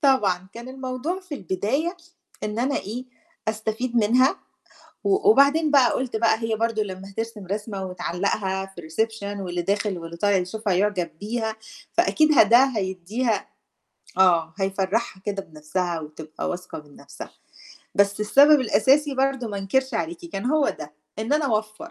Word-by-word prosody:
طبعًا 195 - +2
كان 235 +2 -8
الموضوع 265 +7 -4
في 370 -6 -7
البداية 265 - -1 0.5
إن 210 +1 -3
أنا 265 +4 +1
إيه، 235 +5 -5 0.4
أستفيد 220 +3 -2
منها، 250 - +4 0.7
و 400 +1 +3
وبعدين 305 -3 +5
بقى 275 -3 +5
قُلت 255 -3 -2
بقى 220 -1 +3
هي 225 -1 -1
برضه 225 -1 0
لمّا 195 0 -8
هترسم 225 -1 -5
رسمة 200 -1 -4
وتعلّقها 190 +1 -2
في 175 - -8
الreception 205 +4 -2
واللي 180 -1 -3
داخل 200 +1 -1
واللي 170 0 -8
طالع 205 +1 +3
يشوفها 195 +2 -1
يعجب 190 -2 0
بيها، 220 +1 -2 0.4
فأكيد 310 -3 +3
ه - - +11
ده 235 +5 +6
هيدّيها 200 +5 -1 0.7
آه 170 -4 +4
هيفَرّحها 195 +1 -1
كده 200 -1 -2
بنفسها، 165 +2 -3
وتبقى 155 0 -6
واثقة 180 -2 -6
من 145 -1 -17
نفسها، - - -10 0.6
بس 200 +1 +2
السبب 280 +7 +6
الأساسي 270 +5 +3
برضه 270 -3 0
ما 200 - -4
انكرش 260 +6 0
عليكِ، 170 -4 -3
كان 195 +6 -5
هو 300 +2 +3
ده، 150 - -6 0.3
إن 220 +5 -2
أنا 300 0 +2
أوَفّر 220 +7 -2
215 Hz, 150 wpm, -24 LUFS, 190-255 Hz, 0.7 s, ه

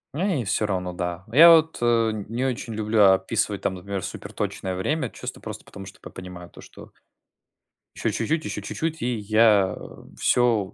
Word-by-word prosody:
Эй, 170 - 0
всё-равно, 95 -3 -1
да. 90 0 -4
Я 165 +7 +9
вот, 160 -1 +4
э, 115 -2 +2 0.2
не 120 +3 -2
очень 120 -3 -3
люблю 110 0 +2
описывать 100 +1 -1
там, 95 - -1
например, 95 +1 -5
суперточное 95 -1 -5
время, 130 - -1
чисто - - -8
просто - - -8
потому, 95 -2 -11
что 95 - -13
п - - -11
понимаю 90 -1 -10
то, - - -14
что - - -14 1.0
ещё - - -1
чуть-чуть, 160 0 -1
ещё 105 0 -4
чуть-чуть, 160 +9 -4
и 125 0 -1
я 105 -2 +3 0.4
всё 115 -6 +2
110 Hz, 160 wpm, -24 LUFS, 95-125 Hz, 1.0 s, Я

